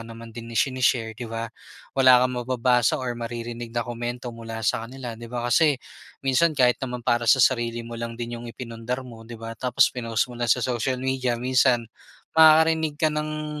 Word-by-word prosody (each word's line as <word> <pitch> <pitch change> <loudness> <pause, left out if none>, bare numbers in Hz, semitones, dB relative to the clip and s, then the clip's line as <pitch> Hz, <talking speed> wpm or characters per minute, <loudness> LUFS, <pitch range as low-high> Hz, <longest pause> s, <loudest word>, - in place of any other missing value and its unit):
naman 115 0 -10
din 115 +1 -9
ishine-share 120 0 +1
di 115 +1 -8
ba? 115 0 -5 0.4
Wala 130 -2 +6
kang 125 - 0
mababasa 125 +2 +2
or 130 -3 -3
maririnig 120 0 -6
na 120 0 -2
komento 120 0 -5
mula 115 -1 -7
sa 115 0 0
kanila 130 -2 -7
di 115 +1 -10
ba, 120 0 -4
kasi 140 +5 +3 0.5
minsan 145 +4 +2
kahit 125 -2 +3
naman 125 -2 -5
para 120 -1 +1
sa - - +7
sarili 120 -2 +1
mo 115 0 -7
lang 115 0 -5
din 120 0 -5
yung 120 - -8
ipinundar 115 +2 -5
mo 115 -2 -12
di 120 - -8
ba 115 0 -7
tapos 125 +1 +2
pinost 115 -3 -1
mo 120 - -10
lang 120 - 0
sa 125 +1 +3
social 125 +1 -1
media 130 -1 -1
minsan 125 0 +2 0.5
makakarinig 160 -1 +5
ka 155 0 +1
ng 150 0 -4
120 Hz, 190 wpm, -24 LUFS, 115-130 Hz, 0.5 s, sa